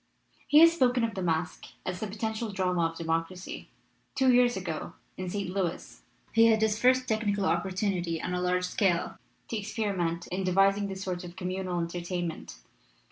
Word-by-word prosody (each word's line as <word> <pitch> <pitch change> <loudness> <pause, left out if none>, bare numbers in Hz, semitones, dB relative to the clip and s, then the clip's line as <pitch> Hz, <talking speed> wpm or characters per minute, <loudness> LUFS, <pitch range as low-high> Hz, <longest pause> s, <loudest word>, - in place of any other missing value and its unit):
He 295 - +5
has 335 0 +8
spoken 255 -6 +2
of 225 -1 0
the 190 - -4
masque 160 -2 -1 0.2
as 180 -1 -3
"the 215 - -3
potential 220 +2 -3
drama 180 -3 +1
of 165 0 -9
democracy." 165 +3 -3 0.5
Two 265 -2 +4
years 245 -2 +4
ago 170 -5 -4 0.2
in 185 -1 -5
St. 195 -1 -3
Louis 185 -3 -3 0.3
he 225 0 +6
had 220 -1 +4
his 220 0 +1
first 255 +1 +4
technical 205 -3 0
opportunity 185 -4 0
on 180 - -3
a 180 - -1
large 180 0 +1
scale 180 -2 0 0.3
to 230 - -2
experiment 195 -5 -2
in 190 +2 -1
de 185 -1 0
vising 195 +1 +3
this 190 -1 -5
sort 180 -1 -3
of 175 0 -9
communal 185 -1 -3
entertainment. 170 - -4
190 Hz, 175 wpm, -29 LUFS, 175-215 Hz, 0.5 s, has